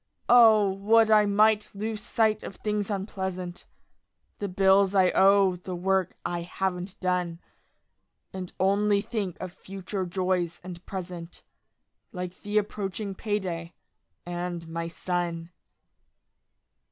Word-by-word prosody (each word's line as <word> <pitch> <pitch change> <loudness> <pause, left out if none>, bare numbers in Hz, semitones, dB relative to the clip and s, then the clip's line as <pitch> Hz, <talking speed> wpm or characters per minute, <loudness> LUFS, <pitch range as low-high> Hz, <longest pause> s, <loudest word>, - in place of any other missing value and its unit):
Ah, 225 -4 +7
would 220 +3 +3
I 210 -1 +6
might 210 +1 +3
lose 215 +1 -4
sight 215 -1 +1
of - - -8
things 210 -1 -2
unpleasant: 190 -3 -4 0.7
The 205 - -3
bills 195 +1 +4
I 185 -2 +5
owe; 195 -1 +4
the 180 +1 -6
work 190 +1 0
I 175 0 -2
haven't 185 +2 -3
done. 180 -2 -1 0.9
And 185 -2 -6
only 200 +1 +3
think 205 -5 -4
of 185 -1 -6
future 190 0 -5
joys 180 -1 -1
and 180 -1 -9
present, 175 -3 -7 0.7
Like 180 -3 -6
the 210 +1 -1
approaching 205 -1 -2
payday, 185 -5 -3 0.5
and 175 -1 -4
my 165 +1 -4
son. 170 -1 -3
190 Hz, 115 wpm, -27 LUFS, 180-205 Hz, 0.9 s, Ah